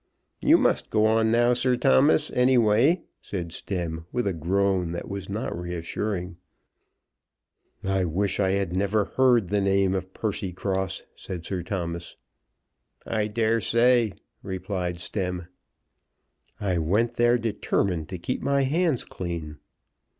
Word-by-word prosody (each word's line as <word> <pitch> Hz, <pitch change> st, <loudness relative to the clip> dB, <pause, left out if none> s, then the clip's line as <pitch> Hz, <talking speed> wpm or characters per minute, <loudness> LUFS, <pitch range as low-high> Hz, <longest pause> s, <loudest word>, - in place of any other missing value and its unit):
"You -, -, +6 dB
must -, -, +1 dB
go 110 Hz, 0 st, +3 dB
on 110 Hz, 0 st, +3 dB
now, 120 Hz, +2 st, +4 dB
Sir 125 Hz, +1 st, +2 dB
Thomas, 140 Hz, +4 st, +4 dB
any 125 Hz, +1 st, +3 dB
way," 120 Hz, -, +4 dB, 0.2 s
said 85 Hz, -4 st, -5 dB
Stemm 85 Hz, -4 st, -4 dB
with 125 Hz, -, -1 dB
a 100 Hz, -, 0 dB
groan 90 Hz, +1 st, 0 dB
that 85 Hz, -, -5 dB
was 100 Hz, -1 st, -6 dB
not 105 Hz, +5 st, -3 dB
reassuring. 90 Hz, +1 st, -4 dB, 1.5 s
"I 95 Hz, -1 st, +1 dB
wish 95 Hz, +5 st, -1 dB
I 95 Hz, -2 st, +3 dB
had 95 Hz, -2 st, 0 dB
never 100 Hz, +2 st, +1 dB
heard 120 Hz, -7 st, +3 dB
the 100 Hz, 0 st, +1 dB
name 95 Hz, -1 st, +2 dB
of 95 Hz, -1 st, -3 dB
Percycross," 95 Hz, -2 st, -3 dB
said 90 Hz, -3 st, -7 dB
Sir 95 Hz, -2 st, -3 dB
Thomas. 85 Hz, -2 st, -4 dB, 0.9 s
"I 110 Hz, -2 st, 0 dB
dare 115 Hz, +1 st, +1 dB
say," 120 Hz, -2 st, +3 dB, 0.3 s
replied 95 Hz, -2 st, -3 dB
Stemm. 90 Hz, -2 st, -3 dB, 1.1 s
"I 95 Hz, -5 st, 0 dB
went 110 Hz, +9 st, +1 dB
there 120 Hz, +1 st, +4 dB
determined 100 Hz, -7 st, -1 dB
to 90 Hz, -, -4 dB
keep 105 Hz, +9 st, -3 dB
my 140 Hz, 0 st, +2 dB
hands 155 Hz, 0 st, +1 dB
clean." 80 Hz, -4 st, -6 dB
100 Hz, 135 wpm, -26 LUFS, 90-115 Hz, 1.5 s, You